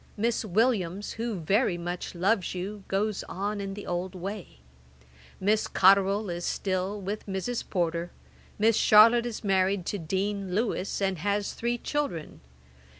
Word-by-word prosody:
Miss 230 +3 0
Williams, 205 -2 0
who 230 -1 -3
very 195 +3 +2
much 175 +1 -5
loves 190 +1 +1
you, 195 +3 -5
goes 205 +1 -1
on 205 +2 -3
in 195 0 -5
the 205 - -8
old 180 +1 -3
way. 185 - -7 0.8
Miss 210 +3 +2
Cotterel 195 +2 +4
is 175 0 -4
still 190 +2 -1
with 205 +2 -5
Mrs. 195 +5 -2
Porter. 170 -2 -1 0.5
Miss 220 +1 +4
Charlotte 230 +3 +6
is 230 -2 -6
married 190 -2 +1
to 205 - -2
Dean 190 +2 -2
Lewis, 205 -3 -1
and 190 -3 0
has 205 +3 -1
three 240 +1 -1
children. 170 - -3
200 Hz, 145 wpm, -28 LUFS, 185-215 Hz, 0.8 s, Charlotte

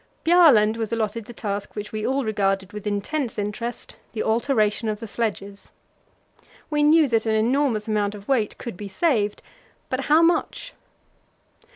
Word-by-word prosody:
Bjaaland 285 -11 +5
was 225 -1 -3
allotted 225 -1 -2
the - - -10
task 205 -3 -5
which 210 0 -6
we 215 -1 -3
all 270 0 0
regarded 195 -2 -1
with 210 0 -6
intense 225 +6 -2
interest 215 +3 -5 0.2
the 220 - -2
alteration 220 -2 +1
of 210 -1 -3
the 225 - -7
sledges. 200 -2 -4 1.0
We 295 0 +1
knew 305 +1 +5
that 225 -1 +1
an 220 - +2
enormous 230 -1 +1
amount 210 -1 0
of 200 0 -12
weight 240 -6 0
could 235 - -7
be 205 +3 -7
saved, 210 - 0 0.5
but 260 +1 -2
how 310 +3 +5
much? 345 +8 0
220 Hz, 160 wpm, -23 LUFS, 210-265 Hz, 1.0 s, Bjaaland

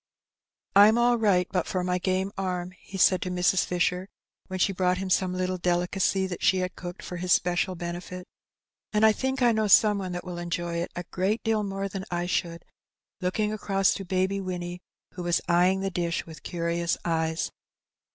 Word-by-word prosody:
'^Pm 210 +3 +7
all 240 0 +3
right 190 -5 +3
but 180 -3 0
for 185 -1 -1
my 180 0 0
game 190 +1 0
arm,'' 180 -2 -3
he 195 - -9
said 185 0 +4
to 180 - -3
Mrs. 180 +1 +2
Fisher, 180 +1 0 0.4
when 190 - -4
she 195 +2 +2
brought 180 0 +1
him 190 0 -4
some 185 +1 +2
little 185 0 -1
delicacy 180 +2 +1
that 185 -2 -5
she 190 - +4
had 185 0 -2
cooked 175 -1 -8
for 180 - -6
his 180 +1 -3
special 180 +1 +2
benefit; 175 +1 -6
^^ - - -12 0.7
and 210 +1 +4
I 220 - +7
think 265 +3 -1
I 240 - +5
know 220 -1 +1
some 205 0 +5
one 185 -2 -4
that 175 - -4
will 180 -1 -6
enjoy 170 0 -3
it 170 - -2
a 175 - -4
great 195 +5 0
deal 225 -1 +1
more 195 -1 -3
than 195 -1 -6
I 175 0 -1
should," 170 -1 -2 0.5
looking 210 +3 -1
across 195 -2 +1
to 195 - -5
Baby 190 +2 0
Winnie, 180 -1 -5 0.3
who 180 - -7
was 175 -1 +1
eyeing 180 +2 +3
the 195 0 -2
dish 170 -1 -2
with 160 -1 -11
curious 170 0 -1
eyes. 160 -1 -1
185 Hz, 200 wpm, -27 LUFS, 175-195 Hz, 0.7 s, ^Pm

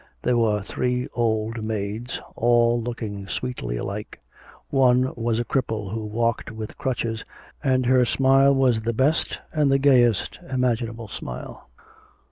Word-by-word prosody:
There 125 - +2
were 110 -3 +2
three 125 +4 -1
old 110 -1 -1
maids, 110 +3 -3 0.2
all 120 0 +3
looking 110 -4 -5
sweetly 100 - -3
alike; 100 +9 -5 0.5
one 130 -1 +3
was 115 -1 -1
a 120 - -1
cripple 110 -6 -2
who 110 -1 -3
walked 115 +2 -1
with 110 -1 -7
crutches, 115 -3 -2 0.4
and 130 -2 +2
her 130 0 +5
smile 135 +2 +4
was 125 -4 +3
the 115 +1 -1
best 135 +7 +1 0.2
and 150 -3 +2
the 135 - +5
gayest 125 -6 +3
imaginable 120 -3 -1
smile. 60 -10 -8
120 Hz, 135 wpm, -24 LUFS, 110-130 Hz, 0.5 s, her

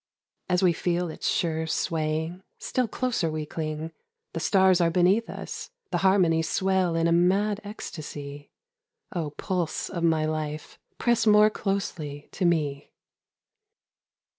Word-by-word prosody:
As 180 +1 +2
we 175 -2 +5
feel 175 0 -1
its - - -4
sure 160 -1 0
swaying 160 +2 -1 0.2
Still 255 -2 -1
closer 235 -7 -1
we 155 -1 -3
cling, 155 +1 -4 0.4
The 165 - -3
stars 190 +1 +4
are 170 - +4
beneath 185 +6 +3
us, - - -6 0.2
The - - +1
harmonies 180 -4 +3
swell 190 -3 +1
in 165 0 +1
a - - +2
mad 195 +5 +2
ecstasy, 145 -8 -8 0.7
Oh 165 -4 -1
pulse 175 +2 -2
of 170 - -3
my 160 -2 +3
life, 155 -1 -4 0.2
press 235 -2 +2
more 210 0 +6
closely 170 -9 -3
to 185 - -2
me. 150 -4 0
170 Hz, 135 wpm, -26 LUFS, 155-190 Hz, 0.7 s, more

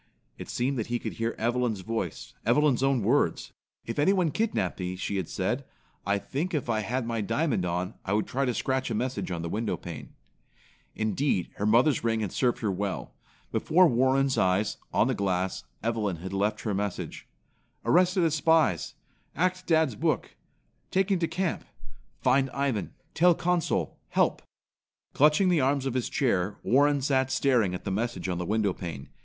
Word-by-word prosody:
It - - -9
seemed 130 +1 -1
that 110 - -2
he 120 0 0
could - - -5
hear 115 0 -2
Evelyn's 120 -3 0
voice, 100 -5 -4
Evelyn's 130 +2 +3
own 135 -4 +2
words. - - +1 0.3
"If 115 - -4
anyone 180 +1 +3
kidnapped 220 - -1
me," 90 0 -3
she 100 +2 -3
had 95 -4 -3
said, - - -1 0.4
"I 100 0 +2
think 155 - -3
if 130 -5 -1
I 110 - +1
had 120 +4 -2
my 115 -1 -2
diamond 115 - 0
on 90 +4 -2
I 95 - -2
would 105 0 +1
try 135 +2 -1
to 125 - 0
scratch 130 -1 -1
a 115 - -1
message 125 +1 -2
on 85 -2 -3
the - - -3
window 110 +5 -2
pane." 85 -4 -9 0.8
Indeed, 110 -2 0
her 105 - 0
mother's 120 +5 +4
ring 115 -1 +1
had 100 -4 -2
served 125 -2 0
her 105 -3 0
well. 95 +1 -3 0.4
Before 180 +3 +4
Warren's 130 +1 +2
eyes, 95 +3 +1
on - - +3
the - - +1
glass, 95 -1 -1 0.2
Evelyn 110 -5 0
had 95 +4 -7
left 100 +2 0
her 105 - -2
message: 100 -1 -4 0.6
"Arrested 180 +1 +4
as 160 -2 +2
spies. 155 - +2 0.4
Ac't 185 +2 0
dad's 160 -5 +3
book. - - -1 0.6
Taken 190 0 +1
to 165 - +1
camp. 170 +2 -2 0.6
Find 135 +1 +3
Ivan. 135 -7 -1 0.2
Tell 175 +1 +5
Consul. 175 -1 0
Help." - - +1 0.7
Clutching 150 +6 +4
the 170 -4 +3
arms 135 +1 +1
of 135 - -1
his 125 -2 -1
chair, 100 -7 0
Warren 145 +1 +3
sat 130 -1 +2
staring 120 -11 +2
at - - -7
the 100 - -3
message 100 -3 -2
on 90 -2 -2
the 90 - -3
window 105 -2 +1
pane. 80 -8 -7
120 Hz, 175 wpm, -28 LUFS, 100-145 Hz, 0.8 s, Tell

